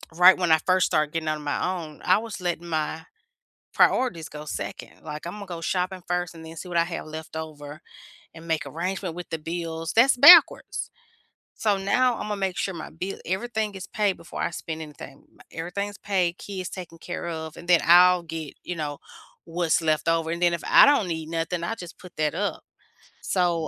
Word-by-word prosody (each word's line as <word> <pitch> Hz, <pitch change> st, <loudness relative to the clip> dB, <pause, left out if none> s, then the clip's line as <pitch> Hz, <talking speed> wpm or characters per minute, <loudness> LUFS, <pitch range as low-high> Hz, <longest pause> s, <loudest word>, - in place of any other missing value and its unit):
right 180 Hz, +2 st, +8 dB
when 180 Hz, -3 st, +1 dB
I 160 Hz, -, +5 dB
first 185 Hz, 0 st, +4 dB
started 150 Hz, -1 st, +1 dB
getting 165 Hz, -1 st, -2 dB
out 155 Hz, -, -1 dB
on 150 Hz, -, -10 dB
my 150 Hz, +5 st, -1 dB
own, 155 Hz, -1 st, -12 dB
I 185 Hz, -, +5 dB
was 225 Hz, -1 st, -7 dB
letting 175 Hz, -1 st, -2 dB
my 160 Hz, 0 st, -2 dB, 0.7 s
priorities 170 Hz, -12 st, +2 dB
go 150 Hz, 0 st, -9 dB
2nd. -, -, -7 dB
Like, 150 Hz, 0 st, -7 dB
Imma 205 Hz, +3 st, -7 dB
go 170 Hz, -2 st, -6 dB
shopping 185 Hz, +2 st, -2 dB
first 175 Hz, -1 st, -1 dB
and 160 Hz, -, -11 dB
then 160 Hz, 0 st, -10 dB
see 180 Hz, -, -7 dB
what 175 Hz, -, -1 dB
I 170 Hz, -, +4 dB
have 170 Hz, -1 st, -5 dB
left 160 Hz, +1 st, -8 dB
over 150 Hz, -1 st, -8 dB, 0.5 s
and 165 Hz, 0 st, -12 dB
make 160 Hz, -2 st, 0 dB
arrangement 185 Hz, +1 st, -3 dB
with 175 Hz, 0 st, -8 dB
the 160 Hz, -, -2 dB
bills. 165 Hz, 0 st, -4 dB
That's 245 Hz, +3 st, +5 dB
backwards, 320 Hz, +4 st, +7 dB, 0.7 s
so 210 Hz, -2 st, +1 dB
now 245 Hz, +5 st, +2 dB
Imma 210 Hz, 0 st, -3 dB
make 195 Hz, -2 st, -2 dB
sure 195 Hz, -, -1 dB
my 165 Hz, -, -7 dB
bill 185 Hz, +4 st, -5 dB
everything 215 Hz, +2 st, -2 dB
is 190 Hz, -1 st, -7 dB
paid 205 Hz, -3 st, 0 dB
before 170 Hz, +1 st, -8 dB
I -, -, +1 dB
spend 160 Hz, -1 st, -6 dB
anything. 150 Hz, -2 st, -11 dB
M -, -, -27 dB
everything's 200 Hz, +5 st, -4 dB
paid, 185 Hz, -3 st, 0 dB
kids 190 Hz, -3 st, -6 dB
taken 175 Hz, -3 st, -8 dB
care 175 Hz, +1 st, -6 dB
of, 160 Hz, -1 st, -6 dB
and 175 Hz, -, -12 dB
then 175 Hz, -2 st, +6 dB
I'll 180 Hz, +1 st, +7 dB
get, 160 Hz, -3 st, -7 dB
you 180 Hz, -, -4 dB
know, 150 Hz, -2 st, -3 dB, 0.5 s
what's 170 Hz, 0 st, 0 dB
left 155 Hz, 0 st, +1 dB
over, 165 Hz, -1 st, +1 dB
and 170 Hz, +1 st, -3 dB
then 175 Hz, -1 st, +4 dB
if 170 Hz, -, -4 dB
I -, -, +8 dB
don't 280 Hz, -8 st, +4 dB
need 160 Hz, -2 st, -4 dB
nothing, 165 Hz, +1 st, -2 dB
I 225 Hz, -, -2 dB
just 175 Hz, -6 st, -10 dB
put 180 Hz, -1 st, -14 dB
that 155 Hz, -1 st, +1 dB
up, 205 Hz, 0 st, -2 dB, 0.6 s
so, 175 Hz, -4 st, 0 dB
170 Hz, 205 wpm, -25 LUFS, 160-185 Hz, 0.7 s, right